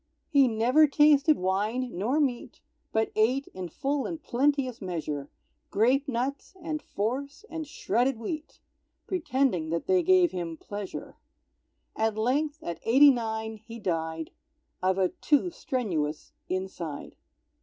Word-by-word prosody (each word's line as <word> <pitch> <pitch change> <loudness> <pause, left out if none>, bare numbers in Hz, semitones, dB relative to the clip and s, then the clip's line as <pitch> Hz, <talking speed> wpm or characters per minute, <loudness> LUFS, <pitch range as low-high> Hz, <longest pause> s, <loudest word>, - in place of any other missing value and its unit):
He 275 -3 +6
never 245 +7 +4
tasted 295 +1 +5
wine 210 +7 -1
nor 235 - +1
meat, 260 -5 -1 0.3
But 220 0 +1
ate, 250 +6 +2
in 185 -2 -5
full 275 - -1
and 330 -2 -5
plenteous 270 -3 0
measure, 155 -6 -4 0.4
Grape 260 +7 +2
Nuts 270 +7 -3
and 315 -3 -4
Force 275 - -3
and 320 -2 -4
Shredded 245 -1 0
Wheat, 305 +8 -6 0.4
Pretending 265 - 0
that 170 +1 -2
they 370 -1 +3
gave 365 -1 +4
him 170 -3 -4
pleasure. 205 +2 -7 0.8
At 220 -1 0
length, 290 +7 0
at 170 - -4
eighty 275 +5 +7
nine, 220 -2 -3
he 230 +2 -10
died, 160 -5 -3 0.5
Of 185 +1 +2
a 185 -2 +3
too 305 +4 +1
strenuous 175 - -3 0.2
inside. 185 -5 -4
240 Hz, 130 wpm, -28 LUFS, 190-285 Hz, 0.8 s, eighty